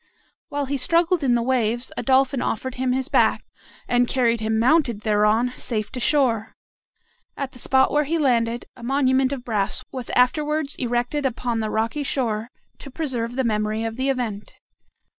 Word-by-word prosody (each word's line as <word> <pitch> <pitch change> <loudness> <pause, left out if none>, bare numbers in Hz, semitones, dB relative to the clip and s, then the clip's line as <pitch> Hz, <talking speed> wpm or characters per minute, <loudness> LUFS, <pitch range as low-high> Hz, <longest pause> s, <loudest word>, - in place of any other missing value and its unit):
While 285 0 -2
he 280 +1 -2
struggled 335 +5 +2
in 250 -3 +3
the 235 - +1
waves, 240 -1 0
a - - -3
Dolphin 265 0 +2
offered 260 +3 -2
him 255 0 -1
his 260 +1 -1
back, - - +2 0.4
and 245 0 +2
carried 235 -3 +2
him 220 0 0
mounted 240 -2 +2
thereon 215 +3 +2
safe 215 -4 -2
to 255 - -4
shore. 240 -5 +1 0.8
At 275 -2 -4
the 250 - -13
spot 265 +2 +3
where 295 0 +2
he 330 +4 0
landed, 240 -5 +1
a - - -14
monument 265 +1 +2
of 260 -3 -5
brass 210 -3 0
was 255 -3 -6
afterwards 295 +4 +1
erected 245 +3 -1
upon 245 -2 -1
the 215 -1 -2
rocky 225 +7 -1
shore, 235 -5 -2 0.3
to 275 - -10
preserve 250 -5 -3
the 265 - 0
memory 215 -1 -1
of 225 0 -3
the 260 +2 -1
event. 235 -6 -3
250 Hz, 175 wpm, -23 LUFS, 230-270 Hz, 0.8 s, in